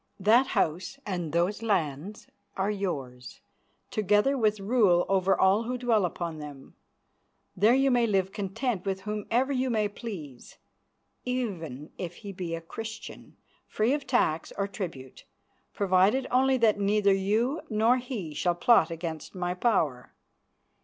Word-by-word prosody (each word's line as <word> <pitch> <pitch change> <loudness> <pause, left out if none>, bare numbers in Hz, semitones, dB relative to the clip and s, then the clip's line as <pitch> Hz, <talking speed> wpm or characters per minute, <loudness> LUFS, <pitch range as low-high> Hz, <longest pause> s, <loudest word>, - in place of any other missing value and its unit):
That 230 +7 +4
house 175 - 0
and 175 -6 -3
those 175 +7 0
lands 185 -2 -2 0.3
are 195 +2 0
yours, 140 -11 -5 0.5
together 210 +6 +2
with 215 -4 +1
rule 195 -4 +3
over 195 0 +2
all 195 +4 +3
who 250 +2 -2
dwell 230 -5 +2
upon 170 -2 -4
them. 145 -3 -10 0.8
There 215 +6 +4
you 270 0 +3
may 240 -2 +3
live 190 -2 +1
content 205 +1 -3
with 190 -1 -3
whomever 215 +6 -1
you 260 0 0
may 215 -3 +1
please, 185 - -9 0.7
even 175 - -4
if 175 -1 -5
he 200 -2 -8
be 175 -3 -4
a 165 - -7
Christian, 225 +6 -9 0.3
free 220 +5 +1
of 285 -1 -3
tax 165 -11 +1
or 200 - 0
tribute, 165 - -7 0.5
provided 200 +6 +2
only 265 +1 +3
that 220 -4 +3
neither 200 0 +3
you 220 +10 0
nor 225 +3 +3
he 240 - -5
shall 175 +4 0
plot 175 -2 +4
against 165 0 -6
my 180 -1 -2
power. 165 - 0
200 Hz, 140 wpm, -28 LUFS, 175-230 Hz, 0.8 s, That